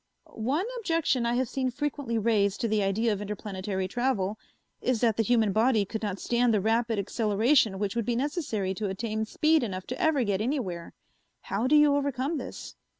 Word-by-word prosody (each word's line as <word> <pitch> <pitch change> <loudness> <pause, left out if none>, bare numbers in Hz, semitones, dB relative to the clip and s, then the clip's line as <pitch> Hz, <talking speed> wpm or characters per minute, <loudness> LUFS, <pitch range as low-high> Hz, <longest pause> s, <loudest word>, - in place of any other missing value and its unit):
"One 270 - -1
objection 330 - +1
I 235 - +1
have 255 0 +1
seen 260 +1 -1
frequently 265 -2 -3
raised 205 -3 +1
to 230 - +1
the 215 -1 +1
idea 210 +3 +1
of 205 - -5
interplanetary 195 -2 -4
travel 220 -3 -1 0.4
is 255 -3 +1
that 230 -3 +3
the 225 - +1
human 225 -2 +2
body 220 0 +3
could 220 +3 -5
not 205 -3 -2
stand 240 0 +2
the 215 - +3
rapid 225 +2 +1
acceleration 215 +2 +2
which 200 +1 -2
would 235 -2 -1
be 240 - +1
necessary 245 - -1
to 205 +1 -3
attain 215 +2 -2
speed 310 +8 +2
enough 190 -6 -4
to 255 - -5
ever 315 -6 +3
get 200 -2 0
anywhere. 215 - -3 0.5
How 215 +6 -1
do 300 - +4
you 295 -1 +6
overcome 280 +2 -1
this?" - - -8
230 Hz, 190 wpm, -28 LUFS, 205-260 Hz, 0.5 s, you